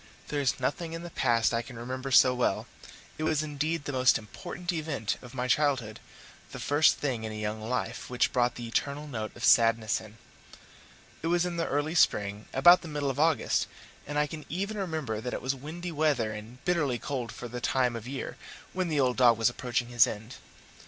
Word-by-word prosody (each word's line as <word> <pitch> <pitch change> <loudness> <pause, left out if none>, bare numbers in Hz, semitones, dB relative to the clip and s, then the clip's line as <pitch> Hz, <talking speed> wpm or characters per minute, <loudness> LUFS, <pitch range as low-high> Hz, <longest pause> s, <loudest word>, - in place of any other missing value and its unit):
There 145 -1 0
is 135 - 0
nothing 160 +6 -2
in 165 +1 -5
the 175 - -8
past 115 -4 +2
I 115 - +1
can 120 0 -11
remember 130 +3 -5
so 130 -1 +6
well: 125 -5 0 0.5
it - - -2
was 155 -1 +1
indeed 155 +1 -2
the - - -2
most 130 -1 +4
important 175 - -6
event 150 -10 -2
of 125 0 -12
my 125 0 -1
childhood 130 -4 +1 0.5
the - - -6
first 145 +2 +4
thing 125 -6 -2
in 110 - -4
a - - -6
young 105 0 -3
life 115 +4 -3
which 125 -1 +1
brought 120 -2 +2
the 120 - -6
eternal 140 +5 -1
note 110 -7 -4
of 120 - -9
sadness 115 -2 +4
in. 110 0 -13 1.0
It 165 - -2
was 175 +1 +2
in 175 -1 -3
the 165 - 0
early 145 +3 -1
spring, 105 -10 +2
about 175 +7 +7
the 170 - -8
middle 145 -3 -1
of 135 - -6
August, 160 0 +2 0.4
and 145 +1 -3
I 150 - +3
can 155 +1 -7
even 200 +6 -2
remember 155 - -3
that 125 - -3
it - - -5
was 130 +1 +1
windy 160 +6 -6
weather 145 -8 +1
and 110 +4 -10
bitterly 150 -8 +1
cold 125 -3 -4
for 120 - -7
the 120 +1 -6
time 125 -2 +1
of 115 0 -6
year, 135 +1 -5 0.4
when 185 -1 -1
the 155 -3 0
old 125 -2 +2
dog 120 -3 +6
was 115 +1 +3
approaching 120 -1 -2
his 120 +2 +5
end. 110 +3 -7
130 Hz, 210 wpm, -29 LUFS, 120-155 Hz, 1.0 s, about